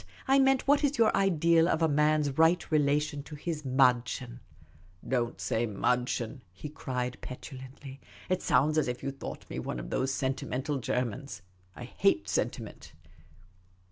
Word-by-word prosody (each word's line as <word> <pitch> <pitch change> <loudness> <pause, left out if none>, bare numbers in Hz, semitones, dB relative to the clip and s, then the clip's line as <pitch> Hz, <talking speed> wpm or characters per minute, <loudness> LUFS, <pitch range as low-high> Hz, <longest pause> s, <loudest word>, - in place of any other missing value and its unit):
I 270 +1 +5
meant, 270 0 +3
what 285 +1 +4
is 285 -1 +1
your 225 -1 +4
ideal 170 -3 +3
of 165 -1 +1
a - - +5
man's 150 -1 +2
right 165 +3 +3
relation 145 0 +1
to 150 +2 -10
his 155 +1 -4
viddchen? 125 -2 +1 0.2
' 80 0 -26
* 85 +4 -26
" 90 0 -19
Don't 120 -2 -1
say 115 +1 0
madchen,'" 125 +3 -1
he 95 +11 -8
cried, 125 -4 -4
petulantly. 130 +1 -9 0.2
" - - -19
It 185 +1 0
sounds 150 +5 +3
as 150 - 0
if 125 0 -4
you 135 - -2
thought 135 - -8
me - - -5
one 60 - -4
of - - -7
those 130 +1 0
sentimental 135 +1 -2
Germans. 125 - -3 0.3
I - - -8
hate - - +1
sentiment." - - -3
135 Hz, 170 wpm, -29 LUFS, 125-155 Hz, 0.3 s, I